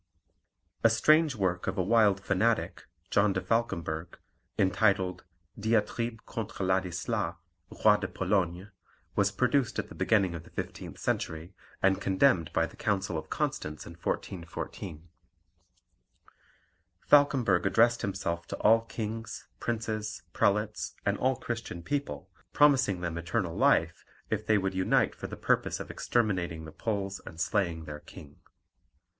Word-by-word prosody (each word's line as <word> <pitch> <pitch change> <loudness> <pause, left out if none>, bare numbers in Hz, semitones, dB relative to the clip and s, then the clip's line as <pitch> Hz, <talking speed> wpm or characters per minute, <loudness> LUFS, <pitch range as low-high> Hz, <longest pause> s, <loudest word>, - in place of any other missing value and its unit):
A 115 - +7
strange 155 +5 +4
work 95 -4 -1
of 95 - -2
a 95 - +2
wild 105 -1 +4
fanatic, 105 +4 0 0.3
John 100 -1 +3
de 95 - 0
Falkemberg, 85 -8 -2 0.4
entitled 95 -1 +2 0.4
Diatribe 115 +1 0
contre 110 -3 -4
Ladislas, 95 -2 -1 0.5
Roi 105 -1 +8
de 100 -2 -3
Pologne, 95 0 -1 0.4
was 100 -1 +3
produced 125 +2 +1
at - - -3
the - - -10
beginning 100 -5 +2
of 85 - -6
the - - -16
fifteenth - - -6
century, 80 +4 -3 0.3
and 95 0 +3
condemned 95 - +3
by - - +2
the - - -11
Council 100 -4 -1
of 80 - -5
Constance 75 +1 -3
in - - -9
1414. 85 -1 -5 2.0
Falkemberg 135 -11 +4
addressed 115 +4 +4
himself 85 -3 -3
to - - -5
all 115 +2 +5
kings, 115 -1 -5
princes, 110 -2 -3
prelates, 105 - 0
and - - +2
all 130 +1 +2
Christian 115 -8 -5
people, 140 - -3 0.3
promising 130 -11 +4
them 85 -1 -3
eternal 85 0 -2
life, - - +2 0.3
if 110 0 -1
they 110 - +5
would 95 -1 -1
unite 95 0 +2
for - - -7
the - - -8
purpose - - +1
of - - -6
exterminating 90 -8 -1
the 80 - -9
Poles 100 -2 -3
and 80 - -10
slaying 85 -3 0
their 75 -1 -7
king. 75 0 -13
100 Hz, 135 wpm, -29 LUFS, 90-115 Hz, 2.0 s, Roi